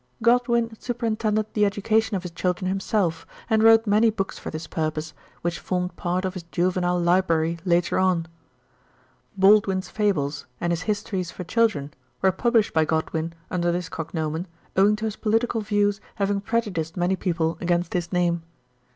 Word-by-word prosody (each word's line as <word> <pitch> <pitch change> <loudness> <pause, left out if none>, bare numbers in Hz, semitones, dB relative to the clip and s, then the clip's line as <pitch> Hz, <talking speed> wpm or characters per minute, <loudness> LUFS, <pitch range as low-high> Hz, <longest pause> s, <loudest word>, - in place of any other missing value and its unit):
Godwin 235 -1 +3
superintended 220 -3 -1
the 210 - +2
education 210 +2 +1
of 185 - -7
his 180 - -6
children 180 +2 -1
himself, 190 -3 -1 0.2
and 220 0 +4
wrote 225 0 +6
many 215 +2 +4
books 195 -3 -3
for - - -6
this 155 +1 -6
purpose, 155 0 -3 0.3
which 175 0 -1
formed 180 -1 -2
part 180 +2 -1
of 185 - -2
his 185 - -6
juvenile 180 0 +1
library 170 -2 +2
later 175 0 +2
on. 185 -3 +2 1.1
"Baldwin's" 195 -1 +4
fables 155 -9 -1
and 175 - 0
his 165 - -2
histories 200 -3 -2
for 180 - -7
children 180 -8 +1 0.3
were 190 - +3
published 230 +2 +2
by 160 - +4
Godwin 160 +1 -1 0.2
under 175 -1 +1
this 175 +1 -3
cognomen, 160 +1 -3 0.3
owing 200 +2 +5
to 215 +1 -4
his 215 -1 -3
political 225 +1 +1
views 205 -1 +1
having 200 -1 0
prejudiced 195 -7 -2
many 180 +2 +1
people 165 -3 -1
against 175 -1 0
his 175 -1 -2
name. 175 -2 +1
185 Hz, 160 wpm, -24 LUFS, 170-210 Hz, 1.1 s, wrote